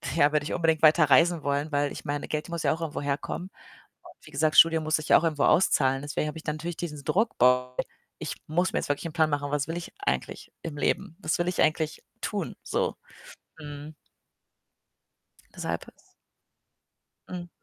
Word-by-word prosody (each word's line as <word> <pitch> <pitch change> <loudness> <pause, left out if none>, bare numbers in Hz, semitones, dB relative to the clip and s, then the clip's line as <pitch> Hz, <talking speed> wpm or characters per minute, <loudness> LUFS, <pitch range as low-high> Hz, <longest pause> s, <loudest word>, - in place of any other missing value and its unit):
ja, 145 -2 +4
würde 150 -1 +1
ich 150 - -4
unbedingt 160 -3 +1
weiterreisen 160 +2 +5
wollen? 145 +2 -1
Weil 145 0 +1
ich - - -8
meine, 145 -1 -3
Geld 155 +2 -3
muss 170 -1 -3
ja - - +3
auch 165 - -7
irgendwo 155 -3 -3
herkommen 145 +6 -3 0.5
und - - -17
wie - - -12
gesagt, 155 +2 +1
Studium 165 -1 +7
muss 155 0 +2
sich 155 0 -7
ja - - +8
auch - - -1
irgendwo 155 -3 +1
auszahlen. 135 -6 +3
Deswegen 145 +1 -2
habe 150 +2 -5
ich 160 - -9
dann 150 - -2
natürlich 170 +2 -5
diesen 150 -5 -5
Druck: 220 - 0
„Boah, 125 0 +3 0.4
ich - - -4
muss 175 +4 0
mir - - +1
jetzt - - -5
wirklich 145 +3 -1
'n 155 - -9
Plan 160 -2 +3
machen, 145 0 -2
was 145 0 0
will 165 - -3
ich 175 - -7
eigentlich 410 - -3
im 155 -3 -6
Leben? 165 +3 -1
Was 155 -3 0
will 175 - 0
ich 180 - 0
eigentlich 155 -1 +1 0.2
tun - - -3
so?“ - - -1 0.6
Mhm. 145 0 -9 1.6
Deshalb - - -3
is - - -13 1.4
Mhm. 175 -1 -6
155 Hz, 195 wpm, -27 LUFS, 145-165 Hz, 1.6 s, ja